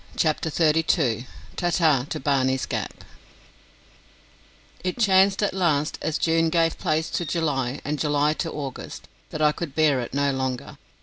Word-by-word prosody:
CHAPTER 160 0 0
THIRTY 160 0 +3
TWO 120 - +1 0.3
Ta 175 - 0
Ta 155 -7 +3
to - - -3
Barney's 130 -1 +1
Gap - - -5 1.8
It 180 0 -2
chanced 195 -2 +4
at 205 - 0
last, 160 -5 0
as 155 0 -1
June 165 +1 +2
gave 165 0 +1
place 160 +1 0
to - - -1
July 145 -6 -1
and 150 0 -2
July 150 0 +2
to 165 +1 -3
August, 140 -3 -7 0.2
that 155 - -3
I 150 - +5
could 150 -2 -6
bear 150 -4 +3
it 120 - -6
no 140 0 +2
longer. 130 -2 -4
155 Hz, 160 wpm, -24 LUFS, 140-165 Hz, 1.8 s, I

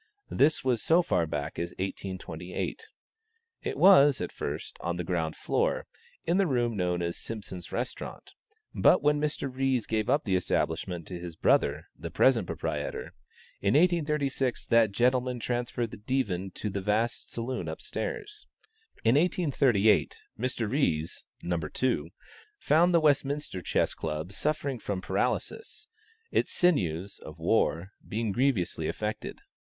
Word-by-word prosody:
This 150 +3 +3
was 125 -4 +1
so 170 +2 +4
far 85 - +1
back 75 +1 -4
as 85 0 -4
1828. 95 - -5 0.7
It 430 -1 -3
was, 145 -8 +7
at - - -3
first, - - -5
on 85 0 -2
the 90 - -2
ground 80 -2 -1
floor, - - 0 0.4
in 170 +2 +2
the 195 -2 +3
room 120 -5 +1
known 90 -2 0
as 85 0 -2
Simpson's 95 -5 -5
Restaurant, - - -5 0.4
but - - +4
when 150 0 +3
Mr. 150 -2 -1
Ries 130 -3 +1
gave 110 -1 -1
up 150 - +3
the 95 -3 +1
establishment 85 -1 -1
to 90 +1 -6
his 85 -2 -7
brother, - - +2
the - - -7
present 115 -8 +3
proprietor, - - -4 0.5
in 100 +4 +2
1836, 150 -6 +1
that 115 -3 +4
gentleman 125 +3 +1
transferred 120 -1 -2
the - - -8
Divan 105 -5 -1
to 105 - -3
the 100 +1 -3
vast 110 +4 -1
saloon 120 +2 -3
up - - -5
stairs. 425 -1 -5 0.6
In 115 - +4
1838, 140 - +3 0.2
Mr. 125 -2 -1
Ries 85 - 0 0.2
(No. 85 -1 0
2) 80 +1 -1 0.5
found 175 - +4
the 170 - +5
Westminster 145 - +1
Chess - - +1
Club 80 +3 -4
suffering 145 0 -1
from 100 -3 -3
paralysis, 445 - -2 0.4
its - - +1
sinews 100 - +1
(of - - -11
war) 85 +5 +1 0.2
being 110 0 -1
grievously 95 - 0
affected. 105 0 -4
115 Hz, 140 wpm, -29 LUFS, 90-140 Hz, 0.7 s, was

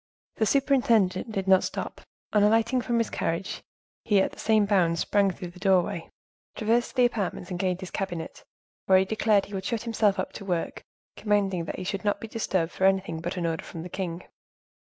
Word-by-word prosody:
The 220 - +2
superintendent 235 -7 +2
did 195 -2 -3
not 190 -1 +5
stop: - - -5 0.3
on 210 - +4
alighting 225 +4 +3
from 240 -1 -1
his 230 -1 0
carriage, 165 +3 -2 0.4
he, 205 -3 +3
at 190 - +1
the - - -15
same 215 -1 +3
bound, 180 -5 +2
sprang 200 +3 +2
through 180 -1 -6
the 180 - -15
doorway, 185 -3 +1 0.5
traversed 230 +4 0
the 250 -2 +5
apartments 200 -6 -2
and 175 - -3
gained 185 0 -1
his 185 - -7
cabinet, 175 -5 -5 0.4
where 190 - +6
he 190 - +3
declared 215 0 +2
he 205 - -13
would 190 -1 -3
shut 230 -2 -2
himself 215 -3 +1
up 185 - -3
to - - -8
work, 180 -4 -2 0.3
commanding 195 -5 0
that - - -5
he 185 - -5
should 195 +2 -3
not 205 -1 0
be 225 - -7
disturbed 190 -6 -1
for 190 - 0
anything 190 -4 +1
but 175 +3 -4
an 175 - -1
order 165 -1 -1
from 165 - -8
the 180 - -7
king. 175 -2 -4
195 Hz, 205 wpm, -27 LUFS, 180-220 Hz, 0.5 s, where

